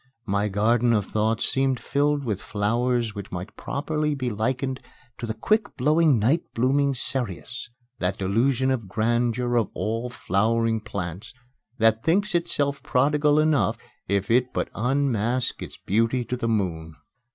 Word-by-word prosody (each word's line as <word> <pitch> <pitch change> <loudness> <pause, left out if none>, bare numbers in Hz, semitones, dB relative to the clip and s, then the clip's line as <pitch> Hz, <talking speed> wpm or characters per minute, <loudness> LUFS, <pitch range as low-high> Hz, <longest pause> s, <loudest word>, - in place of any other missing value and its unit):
My 100 -1 0
garden 115 +4 +2
of 105 -3 +1
thoughts 110 +2 0
seemed 135 -2 +1
filled 145 0 0
with 105 -4 -2
flowers 115 +2 0
which 100 -1 -8
might 90 +3 -6
properly 150 +1 -2
be 130 -3 -2
likened 130 +5 -1 0.4
to 120 - -4
the 110 - -3
quick 210 - 0
blowing 150 +1 +4
night 130 +11 +2
blooming 135 +3 +2
cereus 120 -2 -4 0.3
that 90 +1 -1
Delusion 120 +7 +1
of 115 -6 -2
Grandeur 120 +4 0
of 115 - +1
all 115 +3 -2
flowering 115 +1 +1
plants 100 +1 -6 0.4
that 115 -1 +3
thinks 195 +4 +2
itself 145 -5 0
prodigal 145 +3 +2
enough 155 -1 +2 0.3
if 100 +2 0
it 125 +1 +3
but - - -1
unmask 125 -1 0
its - - -8
beauty 115 +4 0
to 125 - -2
the 115 -2 -2
moon! 85 -7 -2
120 Hz, 145 wpm, -25 LUFS, 110-135 Hz, 0.4 s, blowing